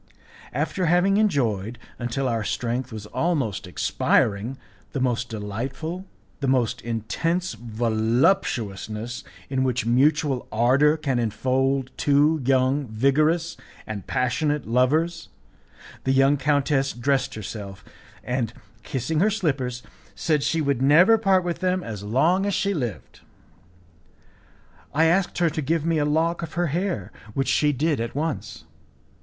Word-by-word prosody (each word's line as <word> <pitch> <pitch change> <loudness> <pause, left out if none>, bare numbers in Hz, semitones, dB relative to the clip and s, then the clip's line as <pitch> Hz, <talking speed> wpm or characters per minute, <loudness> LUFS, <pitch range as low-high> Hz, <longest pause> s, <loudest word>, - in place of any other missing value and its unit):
After 185 -3 -1
having 180 +4 +3
enjoyed, 120 - 0 0.2
until 125 +2 -2
our 115 -3 -1
strength 120 +4 -2
was 110 -2 -7
almost 130 - -1
expiring, 105 +6 +1 0.4
the 140 - -2
most 125 -1 0
delightful, 130 - -5 0.3
the 140 - -2
most 130 -4 +1
intense 165 - -2
voluptuousness 115 - 0 0.2
in 130 -1 0
which 125 -3 0
mutual 135 +2 +2
ardour 135 +7 +3
can 135 -5 -1
enfold 130 +4 0
two 150 +2 +3
young, 130 +2 +2
vigorous, 150 +9 +1 0.3
and 105 -3 -6
passionate 145 +3 0
lovers, 140 +8 +1 0.7
the 130 - +1
young 135 +2 +4
countess 140 -1 +1
dressed 135 +2 0
herself, 100 -2 -7 0.4
and, 125 -3 -2 0.3
kissing 145 +7 -2
her 205 +5 +4
slippers, 135 - -2 0.3
said 155 -4 +1
she 165 +3 0
would 140 -4 0
never 165 +11 +6
part 190 -3 +3
with 175 -1 -3
them 185 -1 0
as 105 -3 -6
long 165 - +2
as 200 - 0
she 200 0 0
lived. 120 - -5 1.8
I 160 +2 +4
asked 175 +3 +2
her 170 -2 +2
to 155 - -3
give 155 +2 0
me 165 -1 +1
a 145 - +1
lock 165 +3 +1
of 165 -2 -6
her 175 0 0
hair, 185 +2 -2 0.2
which 135 0 0
she 150 -1 +3
did 145 +1 0
at 115 +2 -4
once. 155 0 -3
135 Hz, 135 wpm, -24 LUFS, 120-160 Hz, 1.8 s, never